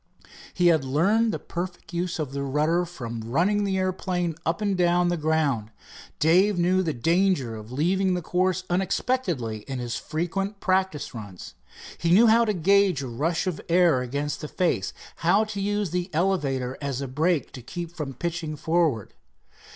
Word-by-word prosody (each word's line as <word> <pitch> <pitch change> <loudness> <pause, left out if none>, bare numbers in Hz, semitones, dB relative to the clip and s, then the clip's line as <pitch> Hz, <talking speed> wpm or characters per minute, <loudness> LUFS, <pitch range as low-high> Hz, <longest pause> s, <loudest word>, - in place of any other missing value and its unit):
He 175 -1 +4
had 160 -4 +3
learned 195 +12 +2
the - - -2
perfect 175 0 -6
use 175 0 -2
of 150 -5 -3
the 140 0 -3
rudder 150 +6 +1
from 120 -10 -6
running 180 - +1
the 190 -1 0
airplane 185 -2 -1
up 165 +3 0
and 205 -2 0
down 175 0 +3
the 175 - +1
ground. 150 -8 0 0.5
Dave 185 +5 +4
knew 180 +2 +3
the 165 -4 -1
danger 165 -3 +1
of 110 +1 -10
leaving 185 +7 +1
the 180 - -3
course 185 +2 0
unexpectedly 175 - -1
in 135 -2 -4
his 120 -1 -3
frequent 195 +6 -3
practice 185 -6 0
runs. 100 -6 -9 0.5
He 170 - 0
knew 200 +7 +7
how 230 +1 +5
to 210 - +1
gauge 190 -3 +3
a - - -4
rush 155 +10 -1
of 185 -4 -3
air 170 -6 +4
against 140 +3 -3
the 150 - -4
face, 160 - 0 0.3
how 185 +6 +3
to 210 -2 -5
use 205 -3 -1
the 180 +1 -2
elevator 140 -8 0
as 140 -2 -3
a 135 - -3
brake 155 +5 0
to 130 - -9
keep 170 +7 -6
from 140 -5 -5
pitching 165 0 -3
forward. 155 - 0
170 Hz, 175 wpm, -25 LUFS, 140-185 Hz, 0.5 s, knew